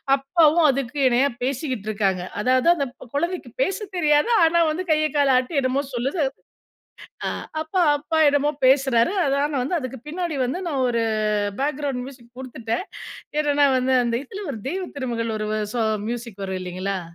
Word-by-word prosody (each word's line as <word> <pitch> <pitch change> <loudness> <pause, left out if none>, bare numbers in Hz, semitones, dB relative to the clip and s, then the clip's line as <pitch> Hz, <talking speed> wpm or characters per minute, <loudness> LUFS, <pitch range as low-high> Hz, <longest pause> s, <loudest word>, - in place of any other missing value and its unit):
அப்பாவும் 310 +3 +4
அதுக்கு 275 +1 -3
இணையா 255 +3 +3
பேசிக்கிட்டு 255 -5 -2
இருக்காங்க. 195 -4 0 0.2
அதாவது, 255 +6 +3
அந்த 280 -5 -1 0.3
கொழந்தைக்கு 345 +4 -2
பேசத் 390 -2 -4
தெரியாது. 300 +4 +3
ஆனா, 335 +1 +4
வந்து 365 +4 -3
கைய, 310 0 +3
கால 275 -3 +4
ஆட்டி 265 +3 0
என்னமோ 260 +2 0
சொல்லுது. 275 +6 0 1.0
ஆ - - +1 0.3
அப்பா 355 +3 0
அப்பா 315 +2 -2
என்னமோ 285 +1 +2 0.2
பேசுறாரு. 265 +2 +4
அதான் 280 +1 +1
நான் 265 -3 0
வந்து 335 +6 0
அதுக்கு 255 -2 -6
பின்னாடி 340 -1 -3
வந்து 310 +9 -3
நான் 270 -4 0
ஒரு 235 -1 0 0.6
பேக்கிரவுண்ட் 280 -3 -2
மியூசிக் 245 -3 -14
குடுத்துட்டேன். 245 +4 -4 0.6
என்னன்னா 290 -1 +3
வந்து 260 +1 +1
அந்த 235 - -1
இதில 390 +7 -8
ஒரு 220 - -7
தெய்வ 370 +3 -3
திருமகள் 230 -3 -2
ஒரு 215 0 -3 0.3
ஸா 235 -2 +1 0.2
மியூசிக் 235 -4 -6
வரும், 190 -1 -4
இல்லைங்களா? 185 +1 -3
275 Hz, 155 wpm, -23 LUFS, 240-310 Hz, 1.0 s, அப்பாவும்